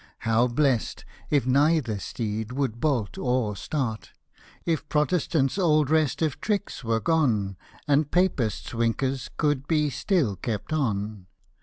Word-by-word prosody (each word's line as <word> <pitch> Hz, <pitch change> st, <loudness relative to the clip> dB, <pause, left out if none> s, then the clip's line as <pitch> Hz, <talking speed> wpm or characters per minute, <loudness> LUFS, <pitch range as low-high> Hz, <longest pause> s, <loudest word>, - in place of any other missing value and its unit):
How 115 Hz, +2 st, +3 dB
blest, 125 Hz, -2 st, 0 dB, 0.2 s
if 145 Hz, -5 st, +2 dB
neither 140 Hz, -4 st, +2 dB
steed 110 Hz, +2 st, -4 dB
would 130 Hz, -4 st, -2 dB
bolt 125 Hz, -9 st, 0 dB
or 125 Hz, -5 st, 0 dB
start; 120 Hz, -, -3 dB, 0.3 s
— -, -, -25 dB, 0.2 s
If 160 Hz, -2 st, -1 dB
Protestanfs 150 Hz, 0 st, +1 dB
old 155 Hz, -5 st, +3 dB
restive 155 Hz, -1 st, +1 dB
tricks 205 Hz, -8 st, -2 dB
were 115 Hz, -1 st, +1 dB
gone, 110 Hz, -, +1 dB, 0.3 s
And 145 Hz, 0 st, +3 dB
PapisVs 145 Hz, -, 0 dB
winkers 120 Hz, +3 st, -1 dB
could 145 Hz, -2 st, 0 dB
be 150 Hz, -3 st, +2 dB
still 145 Hz, -, +1 dB
kept 110 Hz, -, -4 dB
on 105 Hz, -8 st, -2 dB
135 Hz, 130 wpm, -26 LUFS, 115-155 Hz, 0.3 s, How